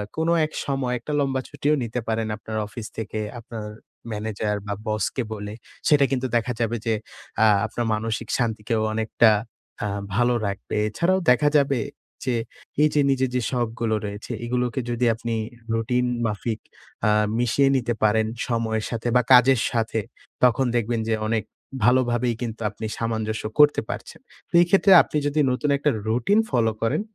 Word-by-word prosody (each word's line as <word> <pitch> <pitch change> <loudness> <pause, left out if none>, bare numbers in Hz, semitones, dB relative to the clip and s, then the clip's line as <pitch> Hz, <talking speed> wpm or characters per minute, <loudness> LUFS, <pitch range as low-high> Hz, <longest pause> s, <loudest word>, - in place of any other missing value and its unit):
কোন 160 +1 -1 0.2
এক 155 - -8
সময় 135 -3 -1
একটা 150 +5 -5
লম্বা 135 -2 0
ছুটিও 145 +1 +1
নিতে 120 +1 -3
পারেন 110 0 -1
আপনার 110 0 -6
অফিস 110 +1 -7
থেকে। 110 -1 -4 0.2
আপনার 115 -2 -8 0.5
ম্যানেজার 105 0 -2
বা 100 - -1
বসকে 110 +4 -1
বলে। 105 -1 -6 0.4
সেটা 145 -2 +5
কিন্তু 130 -1 0
দেখা 120 +2 +1
যাবে 115 +1 0
যে 115 - +2 0.5
আ - - +7 0.2
আপনার 115 +2 -3
মানসিক 110 +1 -2
শান্তিকেও 110 -1 -1
অনেকটা 110 +1 +4 0.5
আ - - 0 0.3
ভালো 120 +3 +3
রাখবে। 100 -1 -5
এছাড়াও 170 - +1
দেখা 145 +4 +4
যাবে 140 -3 +2 0.5
যে 125 -2 +1 0.5
এইযে 150 -1 +3
নিজের 130 -1 +1
যে 125 - +2
শখগুলো 115 -2 -1
কাজ - - -7
রয়েছে। 105 +3 -6
এগুলোকে 125 +1 -1
যদি 120 +1 0
আপনি 115 0 -3 0.4
রুটিন 125 +2 +1 0.2
মাফিক 110 +1 -2 0.5
আ - - +4 0.3
মিশিয়ে 120 +3 +3
নিতে 120 -2 -1
পারেন 110 +1 +3 0.2
সময়ের 110 -2 -1
সাথে 115 0 -3
বা 125 - +6
কাজের 125 -1 +6
সাথে, 115 -1 0 0.4
তখন 125 +1 +4
দেখবেন 115 0 0
যে - - +2
অনেক 110 0 0 0.4
ভালোভাবেই 120 -1 +3
কিন্তু 115 -1 -4
আপনি 110 +1 -7
সামঞ্জস্য 110 -1 -2 0.2
করতে 150 0 +6
পারছেন। - - -6 0.3
তো - - -37
এই - - +5
ক্ষেত্রে 195 +1 +5
আপনি - - -3
যদি 145 +1 0
নতুন 135 +4 -1
একটা 145 +2 +1 0.2
রুটিন 120 - +2
ফলো 115 -4 +2
করেন। 115 - +1
120 Hz, 160 wpm, -24 LUFS, 110-130 Hz, 0.5 s, আ